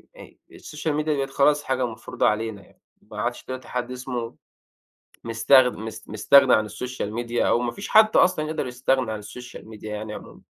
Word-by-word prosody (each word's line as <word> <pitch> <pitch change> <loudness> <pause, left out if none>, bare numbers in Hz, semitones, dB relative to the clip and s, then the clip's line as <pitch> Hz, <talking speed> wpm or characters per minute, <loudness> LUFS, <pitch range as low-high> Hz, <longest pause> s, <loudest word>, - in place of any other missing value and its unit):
آآ - - -13 0.2
السوشيال 150 0 -4
ميديا 150 0 0
بقِت 135 0 -2
خلاص 145 +1 +3
حاجة 130 -1 0
مفروضه 115 -2 -2
علينا 105 -1 -1
يعني، - - -26 0.2
ما 105 0 -8
عادش 120 +2 -3
دلوقتي 130 -1 -7
حد 125 0 -4
اسمه 125 -2 -5 0.9
مستغ 120 +3 +5
مست 110 0 -8
مستغني 130 +5 +5
عن 110 - +3
السوشيال 105 0 -5
ميديا 120 +1 -1
أو 120 - +3
ما 120 -1 -2
فيش 200 - -8
حد 215 0 +5
أصلًا 170 -4 +3
يقدَر 155 -4 -3
يستغنى 125 -1 0
عن 110 - -4
السوشيال 120 +2 -11
ميديا 105 -1 -7
يعني 105 0 -6
عمومًا. - - -11
125 Hz, 180 wpm, -24 LUFS, 110-135 Hz, 0.9 s, مستغ